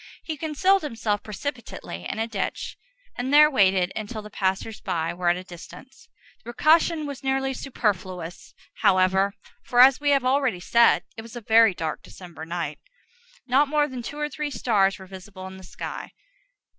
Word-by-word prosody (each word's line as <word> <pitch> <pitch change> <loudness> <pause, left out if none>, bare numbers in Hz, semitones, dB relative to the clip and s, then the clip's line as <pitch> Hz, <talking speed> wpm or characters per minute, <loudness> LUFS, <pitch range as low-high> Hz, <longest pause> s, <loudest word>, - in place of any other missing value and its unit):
He 315 - -4
concealed 330 +6 +2
himself 225 -7 -2
precipitately 210 - -6
in - - -4
a 225 - 0
ditch, 210 -4 -4 0.4
and 250 +2 -3
there 300 +1 +7
waited 190 -6 +3
until 215 0 -5
the 210 - -11
passers 195 +3 -2
by 165 -4 -2
were 175 0 0
at 175 - +2
a 180 - -7
distance. 180 +9 -13 0.3
The - - -35
precaution 310 +6 +3
was 280 -2 -7
nearly 270 0 0
superfluous, 185 -9 -4 0.2
however; 190 +1 +3 0.3
for, 245 - -1
as 260 +1 +8
we 290 - +1
have 275 -3 +3
already 260 -7 +1
said, 235 +6 +4
it - - -5
was 230 +1 -12
a 240 - -6
very 225 -2 +5
dark 160 -2 -4
December 170 -3 -11
night. 165 -3 -4 0.7
Not 275 +3 +3
more 295 +1 +2
than 260 -3 -6
two 290 +5 -7
or 300 0 -1
three 300 0 -4
stars 210 -6 +1
were 190 - -11
visible 190 0 -10
in 190 0 -9
the 190 - -13
sky. 175 - -7
225 Hz, 175 wpm, -25 LUFS, 185-270 Hz, 0.7 s, as